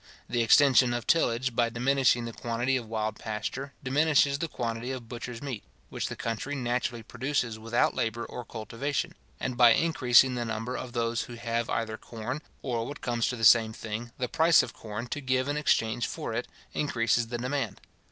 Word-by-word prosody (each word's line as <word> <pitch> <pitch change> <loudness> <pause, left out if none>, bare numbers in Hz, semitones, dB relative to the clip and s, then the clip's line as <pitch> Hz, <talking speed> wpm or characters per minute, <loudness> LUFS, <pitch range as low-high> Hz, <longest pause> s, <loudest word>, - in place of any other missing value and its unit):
The 120 -1 0
extension 125 +1 +5
of 120 - -4
tillage, 130 -6 +2
by 120 -1 +3
diminishing 125 0 +2
the 115 - -6
quantity 120 +4 -1
of 120 -3 -3
wild 110 -1 -2
pasture, 130 +6 -4
diminishes 140 +1 +3
the 165 - -1
quantity 115 -3 -3
of 125 -3 -6
butcher's 120 +1 -7
meat, 130 -7 -5 0.3
which - - -3
the - - -5
country 115 +5 -3
naturally 120 -2 -2
produces 125 -2 -2
without 115 +2 +1
labour 115 +1 -2
or 125 - -7
cultivation; 135 - -3 0.3
and, 125 -1 -2
by 120 -2 +7
increasing 130 -4 +4
the 120 -1 -2
number 115 +2 -3
of 125 -2 -6
those 115 -1 -1
who 120 - -9
have 115 0 -2
either 110 -1 -2
corn, 120 +7 -6 0.2
or, 120 -3 -2
what 145 - -8
comes 120 -2 0
to 125 - -1
the 115 - -7
same 110 0 +6
thing, 110 +2 -6
the 125 - -1
price 165 +4 +5
of - - -7
corn, 110 +1 -6
to 145 - -3
give 130 0 0
in 145 - -1
exchange 120 -5 +1
for - - -5
it, 120 +2 -2 0.3
increases 120 -4 +1
the 120 +1 -3
demand. 125 -4 -2
120 Hz, 190 wpm, -28 LUFS, 115-130 Hz, 0.3 s, by